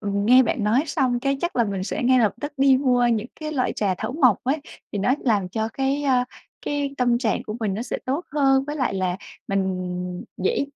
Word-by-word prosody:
nghe 205 +5 +4
bạn 225 -2 -1
nói 230 +7 +3
xong 255 -6 0
cái 275 +1 0
chắc 345 -4 -2
là 235 - +4
mình 195 -3 -3
sẽ 195 - -3
ngay 255 +1 +4
lập 215 -4 +3
tức 290 - -4
đi 270 -1 +5
mua 250 -2 +2
những 230 -2 +1
cái 310 0 -4
loại 260 -4 0
trà 195 -3 0
thảo - - -3
mộc 255 - +3
ấy 275 +5 +1 0.3
thì 205 - -2
nó 245 +7 +2
làm 205 -6 +1
cho 220 +3 -2
cái, 270 +2 -1
a, 255 -3 +2 0.4
cái 285 -1 -2
tâm 245 -1 +2
trạng 230 -4 0
của 215 - -6
mình 200 -3 -1
nó 225 - -3
sẽ 245 - -4
tốt 280 +7 -2
hơn 270 -2 +3
với 295 +1 -5
lại 260 -8 0
là 185 -1 -1 0.3
mình 180 -2 -2
dễ 190 +8 0
245 Hz, 230 wpm, -23 LUFS, 205-270 Hz, 0.4 s, đi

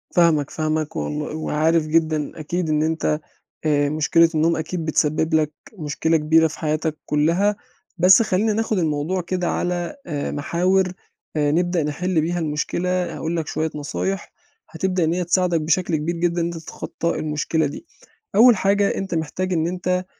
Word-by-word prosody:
فاهمك، 160 -5 +4
فاهمك، 155 -1 -2
والل 150 +1 -3
وعارف 160 +1 +1
جدًا 155 -1 0
أكيد 165 +2 -2
إن 155 0 +2
أنت 160 -1 0 0.5
آآ، 145 -2 +2
مشكلة 155 +2 +3
النوم 165 +2 +3
أكيد 160 +1 -3
بتسبّب 155 +1 +1
لك 155 -1 +2 0.3
مشكلة 160 +2 +1
كبيرة 160 +1 +4
في 160 - -9
حياتك 155 0 -1
كلّها، 170 +8 +2 0.4
بَس 185 +5 +7
خلّينا 215 0 +1
ناخُد 220 0 0
الموضوع 160 +3 0
كده 180 0 -2
على 175 +4 -2
آآ، 145 -4 -3
محاور 180 +5 +1 0.4
آآ، 145 -1 +2
نبدأ 175 +1 +1
نِحلّ 165 +3 0
بيها 175 +3 -1
المشكلة 160 +3 -2 0.3
هاقول 165 +2 -3
لك 160 -2 -3
شوية 160 0 -2
نصايح 95 -10 -3 0.4
هتبدأ 185 +1 -1
إن 160 +1 +1
هي 180 +1 0
تساعدك 175 -1 +1
بشكل 170 +2 +1
كبير 160 +3 -2
جدًا 170 0 0
إن - - +1
أنت 170 0 -4
تتخطى 165 +1 -4
المشكلة 155 +1 0
دي، 145 - -6 0.5
أول 235 +3 +7
حاجة 200 +1 +2
أنت 190 -3 -3
محتاج 180 +4 -2
إن 165 -1 +1
أنت 180 +1 -1
165 Hz, 160 wpm, -22 LUFS, 155-180 Hz, 0.5 s, بَس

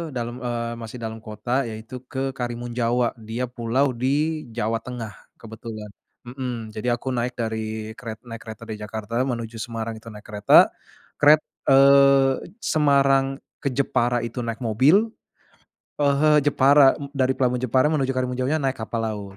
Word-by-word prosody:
dalem, 120 0 -3
eee, 120 -1 -2
masih 115 +2 -7
dalam 110 0 -4
kota 110 +3 -6 0.2
yaitu 110 +3 -8 0.2
ke 135 - -4 0.2
Karimun 120 -1 -4
Jawa 120 0 +2
dia 115 +3 -4
pulau 125 +3 0
di 130 - +1 0.5
Jawa 115 0 0
Tengah 120 -4 -6 0.3
kebetulan, 110 -1 -8 0.4
mhm, 125 -3 -5
jadi 110 +3 -4
aku - - -12
naik 120 +1 -1
dari 110 -1 -4
keret 110 -4 -7
naik 115 -1 -8
kereta 110 -1 -9
dari 110 - -4
Jakarta 110 +1 -7
menuju 115 -3 -4
Semarang 115 0 -4
itu 110 - -15
naik 105 0 -12
kereta, 105 0 -1 0.7
keret 150 +1 +6 0.3
eee, 140 +1 +5
Semarang 140 -3 +3 0.4
ke 140 - +1
Jepara 120 -2 +1
itu 115 +2 -7
naik 115 -1 -4
mobil, 125 - +4 1.1
eee, 140 -1 +3
he 155 - +4 0.2
Jepara 140 -1 +6
m 140 -1 -6
dari 130 -1 +2
pelabuhan 125 -1 0
Jepara 130 +3 +3
menuju 135 -4 +1
Karimun 125 -1 -2
Jawanya 135 +5 +1
naik 135 0 0
kapal 115 +1 -3
laut 100 -2 -6
120 Hz, 160 wpm, -23 LUFS, 110-135 Hz, 1.1 s, keret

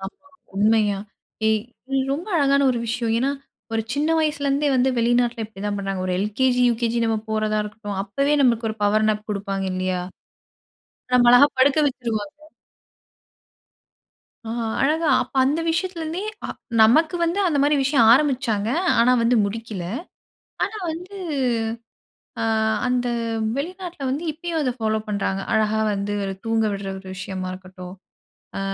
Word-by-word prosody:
ஆமா 285 +9 -11 0.3
உண்மையா. 210 0 +2 0.5
ஏ - - +5 0.6
ரொம்ப 335 +9 -4
அழகான 280 -1 +3
ஒரு 245 - -1
விஷயம் 230 0 -1
ஏன்னா, 265 +3 +1 0.4
ஒரு 225 - 0
சின்ன 290 +3 0
வயசுலேருந்தே 290 -2 +1
வந்து 255 +1 +3
வெளிநாட்டில 240 0 +1
இப்படி 210 -2 -11
தான் 205 0 -1
பண்ணுறாங்க. 195 -1 -3
ஒரு 185 - 0
L.K.G. 250 +4 +1
U.K.G 230 0 -1
நம்ம 225 -1 +1
போறதா 215 0 0
இருக்கட்டும். 210 -2 -6
அப்போவே 275 +9 0
நம்மளுக்கு 235 -4 +2
ஒரு 215 - -7
பவர்னப் 215 0 +1
கொடுப்பாங்க 195 -1 -3
இல்லையா. 185 0 -1 1.1
நம்ம 245 -1 +6
அழகா 245 +4 +8
படுக்க 280 +3 +4
வச்சுடுவாங்க. 225 -5 -4 2.1
அ 225 - -7 0.3
அழகா 310 +3 +2
அப்போ - - -11
அந்த 295 +5 +1
விஷயத்துலேருந்தே, 335 +1 -2 0.2
அ - - -9 0.3
நமக்கு 305 +10 +5
வந்து 340 +3 +1
அந்த 310 -5 +1
மாரி 290 +1 +3
விஷயம் 265 -5 +4
ஆரம்பிச்சாங்க, 245 -7 +2 0.3
ஆனா 245 +2 +5
வந்து 235 +1 +3
முடிக்கல. 210 -2 -5 0.9
ஆனா 435 - -7
வந்து 360 +5 -8 1.3
அ - - +1 0.4
அந்த 250 0 0 0.5
வெளிநாட்டில 350 -1 -5
வந்து 295 +6 -2
இப்பயும் 330 +1 -3
அதை 255 -3 0
ஃபாலோ 220 -1 0
பண்ணுறாங்க. 195 -2 -1
அழகா 220 0 +2
வந்து 200 +1 -2
ஒரு 195 - -3
தூங்க 225 0 +1
விடுற 195 0 -5
ஒரு 190 - -12
விஷயமா 185 0 -5
இருக்கட்டும். 185 0 -10 0.6
அ - - -3
230 Hz, 140 wpm, -22 LUFS, 205-285 Hz, 2.1 s, அழகா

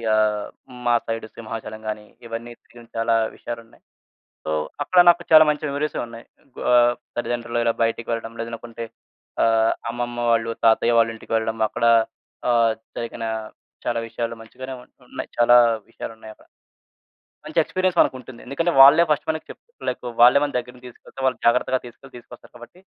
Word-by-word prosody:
ఆహ్, 105 -1 +1 0.4
మా 120 0 +4
సైడ్ 115 -1 -3
సింహాచలం 110 -1 -7
గాని, 105 0 -5 0.2
ఇవన్నీ 115 +1 -6
తిరిగిన 120 -1 -16
చాలా 115 0 +2 0.2
విషయాలున్నాయి. 115 -1 -9 0.6
సో, - - -2 0.3
అక్కడ 180 +5 +1
నాకు 175 0 +5
చాలా 155 0 +10
మంచి 150 +1 -2
మెమోరీసే 145 +2 -2
ఉన్నాయి. 115 0 -11 0.5
ఆహ్, 120 0 +5 0.2
తల్లిదండ్రులు 120 0 -2
ఇలా 115 - +3
బయటికి 115 0 -2
వెళ్ళడం 115 0 -4
లేదనుకుంటే 115 0 -6 0.6
ఆహ్, 115 0 +3 0.2
అమ్మమ్మ 120 0 -4
వాళ్ళు, 115 0 +2
తాతయ్య 115 +1 +4
వాళ్ళింటికి 115 0 -1
వెళ్ళడం 110 0 -2
అక్కడ 115 - -3 0.7
ఆహ్, 115 -1 +4 0.3
జరిగిన 115 0 -5 0.6
చాలా 120 -1 0
విషయాలు 115 0 -4
మంచిగానే 130 +4 -9
ఉన్ - - -22 0.2
ఉన్నాయి. - - -6
చాలా 120 +1 +6 0.3
విషయాలున్నాయక్కడ. 110 -1 -10 1.0
మంచి 155 +2 0
ఎక్స్‌పీరియన్స్ 185 +2 -1
మనకుంటుంది. 130 -2 -1
ఎందుకంటే, 165 +5 -1
వాళ్ళే 145 +5 +8
ఫస్ట్ 150 - 0
మనకి 160 0 -3
చెప్ - - -11 0.3
లైక్ - - -3 0.2
వాళ్ళే 125 +4 +8
మన 145 -1 -2
దగ్గరుండి 125 +1 -9
తీసుకెళ్తే 125 - -14
వాళ్ళు 130 -3 0
జాగ్రత్తగా 125 +2 +3
తీసుకెళ్ళి 125 +2 -14
తీసుకొస్తారు 120 0 -15
కాబట్టి, 120 +9 -14
120 Hz, 145 wpm, -22 LUFS, 115-130 Hz, 1.0 s, చాలా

